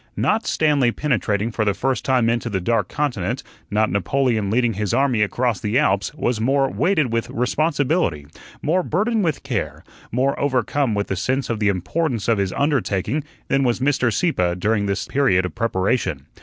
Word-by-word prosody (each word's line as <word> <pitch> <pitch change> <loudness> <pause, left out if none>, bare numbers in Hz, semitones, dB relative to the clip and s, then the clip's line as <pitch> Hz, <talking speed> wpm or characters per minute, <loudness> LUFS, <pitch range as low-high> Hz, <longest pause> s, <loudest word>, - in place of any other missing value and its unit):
Not 220 +2 +1
Stanley 145 -6 +2
penetrating 110 - -1
for 110 - -1
the 100 -2 +1
first 130 +5 -1
time 130 -3 +2
into 115 0 0
the 95 -3 -1
Dark 115 +6 0
Continent, 125 -4 -2 0.3
not 110 +1 +1
Napoleon 110 0 0
leading 120 +1 +2
his 105 -1 -1
army 135 -5 +2
across 115 +1 0
the 105 +3 0
Alps, 100 -9 +1
was 120 -6 -1
more 135 +3 +2
weighted 155 -10 +1
with 115 0 -1
responsibility, 140 - 0 0.4
more 175 +5 +2
burdened 210 +6 0
with 155 -5 -1
care, 125 -7 -3 0.3
more 130 +4 0
overcome 130 -2 0
with 100 0 0
the 95 - -3
sense 130 +7 -1
of 115 - -2
the 105 -1 +2
importance 115 - -1
of 115 -3 +2
his 95 -2 0
undertaking, 140 -2 0 0.2
than 135 0 +2
was 120 -2 +1
Mr. 130 -3 +1
Sieppe 90 - +1
during 105 +2 0
this 95 -1 -1
period 95 -10 +2
of 90 - -5
preparation. 95 - -1
120 Hz, 175 wpm, -21 LUFS, 100-140 Hz, 0.4 s, Stanley